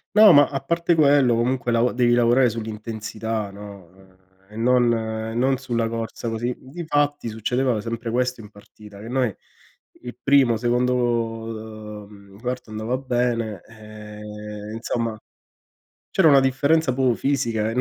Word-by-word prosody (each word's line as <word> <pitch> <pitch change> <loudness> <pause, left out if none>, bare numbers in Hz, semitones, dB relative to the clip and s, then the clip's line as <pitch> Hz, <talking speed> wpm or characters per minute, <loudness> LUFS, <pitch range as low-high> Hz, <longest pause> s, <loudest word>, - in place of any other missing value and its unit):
No 215 -1 +9
ma 145 0 +7
a 135 -2 -4
parte 170 +4 +1
quello 140 -5 +4
comunque 120 0 0
lav 115 +2 +2
devi 120 -1 +2
lavorare 120 +1 +4
sull'intensità, 110 -1 -5
no? 100 -3 -11
Ehm 95 -1 -22 0.3
e - - -11
non 120 0 +3
e 110 0 -3
non 130 +2 +2
sulla 120 -3 -2
corsa 115 0 -5
così. 120 +2 -2
Difatti 145 -3 -2
succedeva 120 +1 0
sempre 115 +1 -4
questo 125 -1 -1
in 105 - -13
partita, 105 0 -15
che 115 - -9
noi 125 -5 0 0.7
il 120 0 -7
primo, 135 -5 +4
secondo 125 +1 +1 1.1
uh - - -15
mhmm, 100 -1 -16
quarto 125 -1 -4
andava 110 +4 -3
bene 120 -6 -1
e 105 -1 -9
insomma 115 -1 -3 0.9
c'era 170 -5 +4
una 140 -1 +7
differenza 140 +2 +2
proprio 130 -2 +2
fisica 115 -6 0
e - - -4
120 Hz, 145 wpm, -23 LUFS, 110-130 Hz, 1.1 s, No